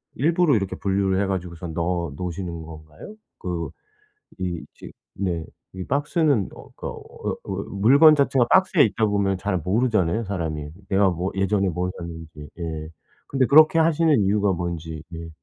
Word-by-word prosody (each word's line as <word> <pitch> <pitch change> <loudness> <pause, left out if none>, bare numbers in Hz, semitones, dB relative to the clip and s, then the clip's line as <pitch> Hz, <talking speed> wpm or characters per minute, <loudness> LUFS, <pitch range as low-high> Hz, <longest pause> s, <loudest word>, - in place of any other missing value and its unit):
일부러 165 0 +3
이렇게 95 -2 -2
분류를 95 -1 +1
해 - - +1
가지고선 90 -3 -4
넣어 85 -2 -1
놓으시는 85 -2 -5
건가요? 80 - -11 0.2
그 85 -2 -3 0.7
이 90 -3 -3
지 - - -10 0.3
네 85 -4 -1 0.3
이 95 -1 -5
박스는 145 - +1
어 - - -13
그러니까 - - -5
어 - - -7
어 - - -5 0.2
물건 140 +11 +6
자체가 135 -4 +2
박스에 190 -4 +5
있다 110 +1 +1
보면 100 -2 0
잘 95 -1 -1
모르잖아요 105 +2 +1
사람이 80 -6 -4 0.2
내가 100 0 +3
뭐 90 +2 -2
예전에 95 0 +1
뭘 90 +2 -2
샀는지. 80 -3 -9
예 80 -2 -5 0.4
근데 135 -2 +2
그렇게 155 +4 +6
하시는 160 -3 +3
이유가 100 0 +2
뭔지. 80 -3 -4
예. 85 0 -7
95 Hz, 325 characters per minute, -23 LUFS, 85-115 Hz, 0.7 s, 물건